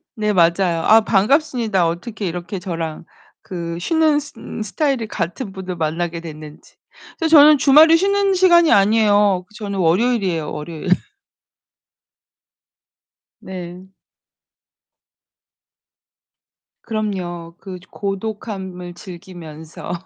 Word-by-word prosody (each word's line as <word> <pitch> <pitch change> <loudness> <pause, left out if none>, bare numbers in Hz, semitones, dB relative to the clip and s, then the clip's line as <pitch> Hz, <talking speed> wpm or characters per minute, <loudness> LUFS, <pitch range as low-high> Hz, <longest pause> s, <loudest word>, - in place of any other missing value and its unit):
네, 210 -1 -1
맞아요. 170 -1 +2
아, 220 +5 +6
반갑습니다. 220 - +1
어떻게 200 +6 -5
이렇게 175 +3 -5
저랑 165 -3 -5 0.4
그 170 -2 -6
쉬는 310 - +2 0.2
음 - - -8
스타일이 260 +1 -1
같은 195 +3 -5
분을 185 -2 -6
만나게 165 +1 -2
됐는지. 155 -2 -12 0.4
그래서 325 - -1
저는 295 +1 +8
주말에 305 +4 +6
쉬는 395 +2 +2
시간이 345 -3 +4
아니에요. 205 -2 +3
저는 200 -3 -5
월요일이에요, 185 -2 0
월요일. 160 +3 -6 2.5
네. 180 0 -9 2.9
그럼요. 180 -6 -5
그 190 -2 -9
고독함을 195 -3 -6
즐기면서. 170 -4 -10
190 Hz, 230 characters per minute, -19 LUFS, 170-225 Hz, 2.9 s, 저는